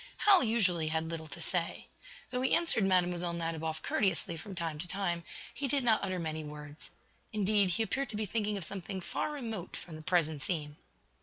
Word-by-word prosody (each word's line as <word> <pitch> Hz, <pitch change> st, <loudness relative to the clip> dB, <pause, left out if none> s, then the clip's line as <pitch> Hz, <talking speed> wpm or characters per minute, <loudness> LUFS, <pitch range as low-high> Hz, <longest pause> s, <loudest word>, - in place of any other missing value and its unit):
Hal 395 Hz, -6 st, +6 dB
usually 195 Hz, -9 st, +3 dB
had 160 Hz, +1 st, -1 dB
little 160 Hz, -1 st, -5 dB
to 140 Hz, -, -8 dB
say. 175 Hz, -2 st, -2 dB, 0.5 s
Though 250 Hz, 0 st, -1 dB
he 260 Hz, -, +4 dB
answered 335 Hz, -11 st, +4 dB
Mlle. 180 Hz, -2 st, +2 dB
Nadiboff 160 Hz, -1 st, -3 dB
courteously 185 Hz, -4 st, +3 dB
from 185 Hz, +4 st, -8 dB
time 165 Hz, -3 st, -2 dB
to 175 Hz, -, -5 dB
time, 175 Hz, -3 st, -1 dB, 0.3 s
he 280 Hz, -, -2 dB
did 275 Hz, 0 st, +1 dB
not 225 Hz, -3 st, +5 dB
utter 185 Hz, -1 st, -1 dB
many 160 Hz, -2 st, -3 dB
words. 150 Hz, 0 st, -8 dB, 0.4 s
Indeed, 205 Hz, -2 st, +3 dB
he 215 Hz, +6 st, +1 dB
appeared 270 Hz, +3 st, -2 dB
to 215 Hz, -, -5 dB
be 215 Hz, -, -1 dB
thinking 210 Hz, 0 st, -1 dB
of 185 Hz, -, -4 dB
something 190 Hz, +1 st, -5 dB
far 185 Hz, -, -2 dB
remote 225 Hz, -, -5 dB
from 165 Hz, -, -9 dB
the -, -, -9 dB
present 160 Hz, -3 st, +1 dB
scene. 150 Hz, -1 st, -3 dB
180 Hz, 190 wpm, -32 LUFS, 160-215 Hz, 0.5 s, Hal